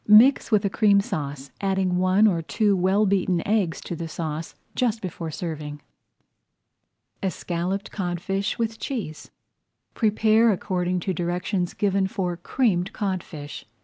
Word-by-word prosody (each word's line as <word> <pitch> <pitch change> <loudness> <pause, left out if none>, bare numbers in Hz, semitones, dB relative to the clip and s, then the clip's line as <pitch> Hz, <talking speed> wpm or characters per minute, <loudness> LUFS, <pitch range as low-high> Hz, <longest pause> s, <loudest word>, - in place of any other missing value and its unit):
Mix 225 +6 +7
with 210 -3 +3
a - - +2
Cream 200 -2 +4
Sauce, 145 -8 -4
adding 190 -2 +1
one 185 +3 +4
or 175 -6 +3
two 205 +5 +1
well 190 +3 +3
beaten 185 -3 +1
eggs 200 -6 +1
to 175 - -5
the 165 0 -5
sauce 160 0 -4 0.2
just 230 -3 +1
before 175 -4 -5
serving. 150 -2 -5 1.4
ESCALLOPED 185 +1 -2
CODFISH 195 +1 -2
WITH 225 -1 -2
CHEESE 210 - -5 0.6
Prepare 220 +1 +4
according 180 -2 -1
to 190 - -1
directions 175 +1 -1
given 195 -1 +1
for 180 -2 -2
Creamed 185 0 0
Codfish. 170 -7 -4
185 Hz, 130 wpm, -25 LUFS, 175-205 Hz, 1.4 s, Mix